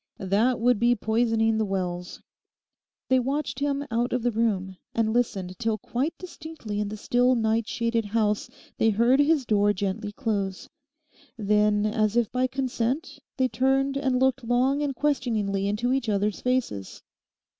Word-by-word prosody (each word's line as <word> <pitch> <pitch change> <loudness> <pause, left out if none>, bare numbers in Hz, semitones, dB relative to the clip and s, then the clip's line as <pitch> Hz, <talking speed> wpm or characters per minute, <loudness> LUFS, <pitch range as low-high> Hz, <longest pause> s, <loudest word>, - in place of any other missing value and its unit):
That 215 +6 +1
would 240 -1 +3
be 240 +1 +4
poisoning 225 0 +1
the - - +2
wells.' 180 -3 -4 0.8
They 260 0 +4
watched 270 +1 -2
him 285 0 -1
out 240 +2 0
of 250 -2 -1
the 245 - +2
room, 200 -5 -1 0.2
and 220 -1 +1
listened 195 -6 -1
till 225 -2 0
quite 265 - -3
distinctly 320 - -7
in 210 - -1
the 215 +1 -6
still 245 +4 +2
night 225 -1 +1
shaded 230 -1 -1
house 210 0 0 0.3
they 225 - +4
heard 235 +5 +3
his 290 -2 +3
door 205 -2 +3
gently 205 +2 -3
close. 205 -5 -3 0.7
Then, 210 0 +2
as 215 +1 +1
if 235 -3 +1
by 255 +1 +1
consent, 260 +3 -2 0.2
they 260 -1 +3
turned 270 +3 +1
and 265 -2 +1
looked 265 -1 +2
long 255 +4 +2
and 285 -2 -1
questioningly 220 -9 0
into 225 +5 0
each 265 -4 -1
other's 205 0 0
faces. 250 - -2
230 Hz, 155 wpm, -26 LUFS, 210-255 Hz, 0.8 s, be